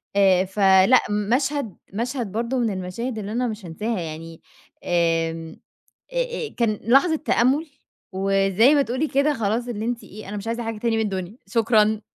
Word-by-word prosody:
آآ، 190 -2 +4
فلأ 195 +4 +5
مشهد 235 - -1 0.2
مشهد 235 -1 -3
برضو 235 +4 -1
من 235 -2 +1
المشاهد 195 +6 -4
اللي 205 0 -5
أنا 245 +2 0
مش 215 -3 -6
هانساها 210 +6 -3
يعني 165 0 -7 0.4
آمم، 165 -1 0 0.6
أ-أ - - -2
كان 220 -3 +1
لحظة 275 - +4
تأمُّل، 290 +1 +1 0.5
وزي 195 +6 +3
ما 285 - +4
تقولي 260 +4 -1
كده 280 +2 +2
خلاص 225 0 -1
اللي 220 -3 -4
أنتِ 235 0 -3
إيه 210 0 -11
أنا 210 - -5
مش 205 - -7
عايزة 230 +1 -2
حاجة 225 -1 -4
تاني 225 +1 0
من 220 - +1
الدنيا، 195 +1 -4
شكرًا 220 0 +2
220 Hz, 165 wpm, -23 LUFS, 195-245 Hz, 0.6 s, فلأ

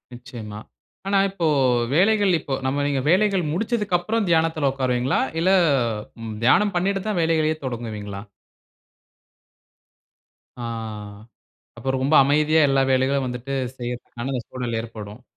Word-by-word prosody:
நிச்சயமா. 115 -4 -9 0.5
ஆனா 195 0 +3
இப்போ 190 -3 -3 0.5
வேலைகள் 200 +4 +3
இப்போ 140 - -5
நம்ம 135 +2 0
நீங்க 140 -2 0
வேலைகள் 190 +1 +3
முடிச்சதுக்கப்றம் 210 0 0
தியானத்துல 160 -3 +2
உட்காருவீங்களா? 130 -1 0 0.2
இல்ல, 180 +3 +3 0.9
தியானம் 200 - +4
பண்ணிட்டு 195 +2 0
தான் 210 -5 0
வேலைகளையே 160 -1 +2
தொடங்குவீங்களா? 110 -5 -5 2.4
ஆ, - - -5 1.2
அப்ப - - -11
ரொம்ப 135 +4 +1
அமைதியா 150 +3 +3
எல்லா 135 0 +3
வேலைகளும் 130 +1 +1
வந்துட்டு, 125 +2 -6 0.3
செய்றதுக்கான 120 +1 -5
அந்த 125 -2 -2
சூழல் 120 -3 -3
ஏற்படும். 110 0 -9
140 Hz, 110 wpm, -23 LUFS, 125-175 Hz, 2.4 s, தியானம்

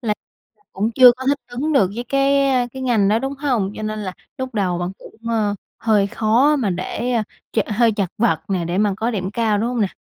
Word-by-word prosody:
Là 215 -5 -1 0.6
cũng 210 +4 -1
chưa 250 -1 +9
có 260 +1 -7
thích 285 +1 +2
ứng 270 +6 -2
được 195 -10 +3
với 240 - -3
cái 275 +2 +2 0.4
cái 265 0 -7
ngành 225 -6 +2
đó, 215 +2 +3
đúng 270 +2 -3
hông? 250 -9 -1
Cho 215 - -6
nên 215 0 -3
là 185 -3 -4 0.3
lúc 260 -2 -5
đầu 180 -4 0
bạn 175 +1 -3
cũng, - - -14 0.2
ờ, 215 -3 +1 0.2
hơi 210 -3 +2
khó 235 +7 +2
mà 220 -8 0
để 185 +7 -3 0.4
ch - - -1
hơi 225 +1 +3
chật 200 -3 -1
vật 185 -9 +2
nè, 185 -3 -1
để 175 +3 -2
mà 205 -2 +2
có 225 +2 -1
điểm 190 -4 -3
cao, 215 -1 +1
đúng 220 - 0
hông 245 -2 -2
nè? 205 - +2
220 Hz, 235 wpm, -20 LUFS, 200-250 Hz, 0.6 s, chưa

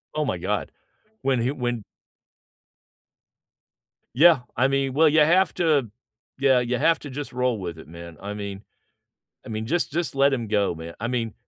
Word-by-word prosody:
Oh, - - 0
my - - -1
god, - - -2 0.5
when 130 -3 +1
he 125 - 0
when 120 -5 -3 2.3
Yeah, 160 +1 +6 0.2
I 130 +3 +4
mean, 135 -1 0
well, 160 +4 +5
you 155 +1 +4
have 175 +5 +4
to, 150 - +2 0.5
yeah, 135 -2 +4
you 125 0 -1
have 165 +4 +3
to 145 - -9
just 140 0 -6
roll 125 -3 0
with 85 -3 -6
it, 80 - -12
man. 85 -1 -11
I 100 +1 -5
mean, 100 -1 -6 0.8
I - - -9
mean, 110 0 -4
just 170 -2 0
just 170 -2 -2
let 140 0 +4
him 120 -4 -2
go, 100 -4 +1
man. 80 +1 -9
I 115 - -2
mean, 120 -3 -2
125 Hz, 180 wpm, -24 LUFS, 105-145 Hz, 2.3 s, Yeah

